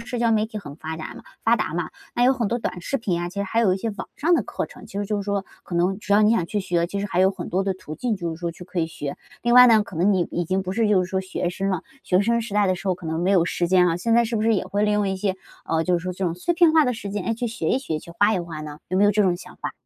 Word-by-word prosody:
社 245 Hz, +1 st, -5 dB
交 235 Hz, -1 st, +2 dB
媒 215 Hz, -1 st, +2 dB
体 215 Hz, -1 st, -6 dB
很 145 Hz, -7 st, -9 dB
发 160 Hz, 0 st, -6 dB
达 160 Hz, -, -7 dB
嘛 -, -, -11 dB, 0.2 s
发 230 Hz, +1 st, +5 dB
达 -, -, -2 dB
嘛， 170 Hz, -2 st, -2 dB, 0.2 s
那 240 Hz, -, +3 dB
有 260 Hz, -, +6 dB
很 245 Hz, -4 st, -1 dB
多 235 Hz, -, 0 dB
短 180 Hz, -6 st, -4 dB
视 275 Hz, -, -2 dB
频 180 Hz, -7 st, -1 dB
啊， 175 Hz, -, -2 dB
其 -, -, -13 dB
实 200 Hz, 0 st, -1 dB
还 225 Hz, +4 st, 0 dB
有 205 Hz, -5 st, +4 dB
一 -, -, -2 dB
些 225 Hz, +4 st, -3 dB
网 205 Hz, -, -7 dB
上 335 Hz, +4 st, +3 dB
的 -, -, +2 dB
课 -, -, -4 dB
程， -, -, -14 dB
其 200 Hz, -, -6 dB
实 205 Hz, -, -1 dB
就 210 Hz, -, -1 dB
是 200 Hz, -, -2 dB
说， 200 Hz, -1 st, -2 dB, 0.2 s
可 175 Hz, -, -7 dB
能 180 Hz, +3 st, +1 dB
只 205 Hz, -, -3 dB
要 210 Hz, +1 st, +6 dB
你 210 Hz, -, +5 dB
想 225 Hz, -7 st, +2 dB
去 205 Hz, +3 st, -2 dB
学， 175 Hz, -3 st, 0 dB
其 200 Hz, +3 st, -4 dB
实 205 Hz, -, -2 dB
还 180 Hz, -2 st, 0 dB
有 190 Hz, +1 st, +5 dB
很 190 Hz, -3 st, -7 dB
多 185 Hz, +3 st, 0 dB
的 195 Hz, 0 st, 0 dB
途 165 Hz, -4 st, -9 dB
径 235 Hz, +4 st, -1 dB
就 170 Hz, -3 st, -3 dB
是 -, -, -10 dB
说 170 Hz, -1 st, -2 dB
去 170 Hz, +2 st, -11 dB
可 180 Hz, 0 st, -5 dB
以 160 Hz, -, +1 dB
学。 145 Hz, -3 st, -6 dB, 0.3 s
另 240 Hz, 0 st, +2 dB
外 250 Hz, 0 st, +10 dB
呢 225 Hz, -3 st, +6 dB
可 195 Hz, -, -10 dB
能 185 Hz, +5 st, +3 dB
你 185 Hz, -3 st, +1 dB
已 175 Hz, -, -1 dB
经 190 Hz, +3 st, 0 dB
不 185 Hz, 0 st, -4 dB
是 220 Hz, +1 st, +1 dB
就 190 Hz, -3 st, +3 dB
是 180 Hz, -, -9 dB
说 190 Hz, -, 0 dB
学 185 Hz, -1 st, -3 dB
生 195 Hz, +2 st, -2 dB
了， 185 Hz, -3 st, -1 dB, 0.2 s
学 180 Hz, 0 st, +3 dB
生 235 Hz, +3 st, +2 dB
时 220 Hz, -, -8 dB
代 205 Hz, -1 st, +3 dB
的 185 Hz, -, +2 dB
时 185 Hz, +2 st, -8 dB
候 185 Hz, -, +2 dB
可 175 Hz, -2 st, -10 dB
能 160 Hz, +1 st, -2 dB
没 180 Hz, +2 st, +1 dB
有 185 Hz, -4 st, +4 dB
时 175 Hz, 0 st, -1 dB
间 180 Hz, 0 st, +5 dB
啊， 165 Hz, -, 0 dB
现 225 Hz, +6 st, +1 dB
在 235 Hz, 0 st, +5 dB
是 230 Hz, 0 st, -2 dB
不 215 Hz, -, 0 dB
是 225 Hz, 0 st, +3 dB
也 195 Hz, -, 0 dB
会 205 Hz, +1 st, -1 dB
利 210 Hz, 0 st, +2 dB
用 210 Hz, -1 st, +1 dB
一 190 Hz, -, -1 dB
些， 190 Hz, 0 st, -1 dB, 0.4 s
嗯， 160 Hz, 0 st, +1 dB
就 180 Hz, 0 st, +2 dB
是 -, -, -10 dB
说 180 Hz, 0 st, -3 dB
这 185 Hz, +2 st, -3 dB
种 170 Hz, -2 st, 0 dB
碎 180 Hz, -, -1 dB
片 335 Hz, -2 st, +5 dB
化 315 Hz, -1 st, +5 dB
的 250 Hz, -, +1 dB
时 220 Hz, -3 st, -6 dB
间， 205 Hz, -1 st, -3 dB
哎， 230 Hz, -, 0 dB
去 240 Hz, +2 st, -3 dB
学 220 Hz, -8 st, -3 dB
一 -, -, +2 dB
学、 165 Hz, -, -3 dB
去 170 Hz, -, -12 dB
画 205 Hz, +2 st, +4 dB
一 -, -, 0 dB
画 165 Hz, -3 st, -7 dB
呢？ 150 Hz, -1 st, -8 dB
有 185 Hz, -, -1 dB
没 200 Hz, -, +5 dB
有 205 Hz, -, +5 dB
这 210 Hz, +1 st, +3 dB
种 180 Hz, -3 st, +2 dB
想 -, -, -13 dB
法？ -, -, -5 dB
195 Hz, 390 characters per minute, -23 LUFS, 175-220 Hz, 0.4 s, 外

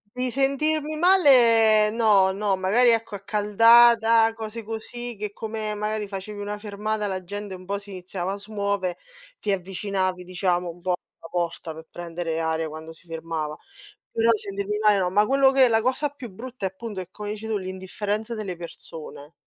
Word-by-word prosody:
Di 250 Hz, 0 st, -1 dB
sentirmi 300 Hz, +3 st, 0 dB
male 235 Hz, -, +6 dB
no 210 Hz, -4 st, +4 dB
no, 200 Hz, 0 st, 0 dB
magari 200 Hz, +7 st, +3 dB
ecco 225 Hz, -1 st, 0 dB
accaldata, 225 Hz, +3 st, +5 dB
cose 225 Hz, 0 st, -7 dB
così, 235 Hz, +2 st, -6 dB
che 210 Hz, 0 st, -4 dB
come 215 Hz, 0 st, -4 dB
magari 210 Hz, 0 st, -2 dB
facevi 200 Hz, +1 st, -7 dB
una 205 Hz, 0 st, -4 dB
fermata 210 Hz, 0 st, -3 dB
la 190 Hz, -2 st, -3 dB
gente 205 Hz, +1 st, -6 dB
un 185 Hz, 0 st, -10 dB
po' 200 Hz, +1 st, -2 dB
si 200 Hz, 0 st, -13 dB
iniziava 185 Hz, 0 st, -4 dB
a -, -, -4 dB
smuovere, 200 Hz, -3 st, -2 dB, 0.4 s
ti 205 Hz, -, -1 dB
avvicinavi 185 Hz, 0 st, -2 dB
diciamo 180 Hz, -1 st, -1 dB
un 170 Hz, +1 st, -13 dB
po' 180 Hz, +1 st, -1 dB
alla 180 Hz, -1 st, -8 dB
porta 170 Hz, -2 st, -3 dB
per 160 Hz, +1 st, -11 dB
prendere 170 Hz, -1 st, -4 dB
aria 160 Hz, 0 st, -1 dB
quando 160 Hz, +1 st, -9 dB
si 170 Hz, -, -20 dB
fermava; 160 Hz, -2 st, -4 dB, 0.5 s
però 230 Hz, 0 st, +2 dB
sentirmi 200 Hz, -1 st, -3 dB
male 210 Hz, -1 st, +4 dB
no. 180 Hz, -2 st, 0 dB
Ma 205 Hz, +3 st, +3 dB
quello 270 Hz, +1 st, +4 dB
che 265 Hz, -2 st, +6 dB
la 225 Hz, -1 st, +2 dB
cosa 260 Hz, +5 st, 0 dB
più 275 Hz, -5 st, -10 dB
brutta 240 Hz, +3 st, -8 dB
è -, -, +1 dB
appunto 205 Hz, 0 st, -6 dB
che, 180 Hz, -, -8 dB
come 210 Hz, +1 st, -6 dB
dici 215 Hz, +1 st, -6 dB
tu, 220 Hz, -2 st, -1 dB
l'indifferenza 200 Hz, +4 st, -4 dB
delle 195 Hz, -5 st, -5 dB
persone. 160 Hz, -3 st, -10 dB
205 Hz, 175 wpm, -24 LUFS, 185-225 Hz, 0.5 s, male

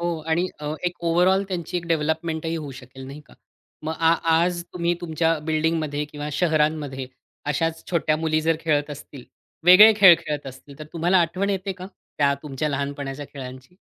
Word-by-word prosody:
हो, 170 Hz, -1 st, -2 dB
आणि 170 Hz, +3 st, +1 dB
अ, 150 Hz, 0 st, -3 dB
एक 175 Hz, 0 st, -1 dB
ओव्हरऑल 180 Hz, +3 st, +3 dB
त्यांची 180 Hz, -1 st, -4 dB
एक 170 Hz, -1 st, -4 dB
डेव्हलपमेंटही 160 Hz, 0 st, -1 dB
होऊ 150 Hz, -3 st, -6 dB
शकेल 130 Hz, +1 st, -12 dB
नाही 140 Hz, +3 st, -9 dB
का? -, -, -19 dB, 0.5 s
मग 155 Hz, +1 st, -3 dB
आ 165 Hz, 0 st, +4 dB, 0.2 s
आज 175 Hz, +1 st, +1 dB
तुम्ही 175 Hz, -1 st, 0 dB
तुमच्या 165 Hz, -1 st, 0 dB
बिल्डिंगमध्ये 155 Hz, -2 st, 0 dB
किंवा 150 Hz, 0 st, -7 dB
शहरांमध्ये, 150 Hz, -5 st, 0 dB, 0.4 s
अशाच 160 Hz, +3 st, -1 dB
छोट्या 160 Hz, -3 st, +1 dB
मुली 155 Hz, 0 st, 0 dB
जर 160 Hz, 0 st, +1 dB
खेळत 150 Hz, -2 st, 0 dB
असतील. 140 Hz, -2 st, -10 dB, 0.4 s
वेगळे 195 Hz, +5 st, +9 dB
खेळ 190 Hz, -4 st, +9 dB
खेळत 150 Hz, -2 st, -5 dB
असतील 135 Hz, +1 st, -12 dB
तर 155 Hz, -, -7 dB
तुम्हाला 175 Hz, +3 st, +2 dB
आठवण 185 Hz, +4 st, -1 dB
येते 195 Hz, 0 st, -2 dB
का? 185 Hz, 0 st, -9 dB, 0.3 s
त्या 140 Hz, -1 st, +3 dB
तुमच्या 150 Hz, 0 st, -3 dB
लहानपणाच्या 140 Hz, 0 st, -4 dB
खेळांची? 130 Hz, +4 st, -10 dB
160 Hz, 170 wpm, -23 LUFS, 145-170 Hz, 0.5 s, वेगळे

